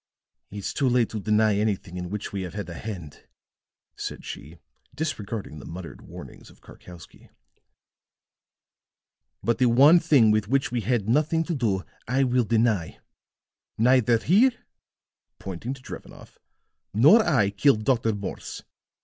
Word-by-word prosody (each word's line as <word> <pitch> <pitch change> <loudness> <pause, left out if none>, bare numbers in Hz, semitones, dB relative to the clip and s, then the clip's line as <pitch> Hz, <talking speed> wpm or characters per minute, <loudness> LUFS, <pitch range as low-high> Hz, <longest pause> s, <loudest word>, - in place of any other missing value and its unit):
"It's 100 -1 -5
too 135 - +1
late 120 -2 +2
to 110 - -5
deny 105 0 +2
anything 100 -4 -2
in 90 -1 -5
which 105 +1 -5
we 100 - -3
have 90 +1 -7
had 105 -4 -5
a - - -6
hand," 85 -5 -8 0.7
said - - -7
she, 75 +5 -9 0.4
disregarding 110 - -5
the - - -11
muttered 85 0 -9
warnings - - -12
of - - -20
Karkowsky. 85 -2 -15 2.1
"But 115 -1 0
the 130 - +4
one 140 +8 +6
thing 140 -10 +4
with 105 -1 +1
which 135 +2 0
we 120 -1 -1
had 110 -1 -1
nothing 155 +6 +2
to 170 - -3
do 105 - -1 0.2
I 130 +3 +1
will 125 -2 +1
deny. 110 -6 0 0.8
Neither 120 0 +4
he," 210 - +3 0.8
pointing 100 +8 -6
to 130 - -16
Drevenoff, - - -11 0.6
"nor 155 - +6
I 125 - +2
killed 110 +1 +2
Dr. 115 -4 +1
Morse. 100 -1 -7
110 Hz, 140 wpm, -25 LUFS, 100-130 Hz, 2.1 s, one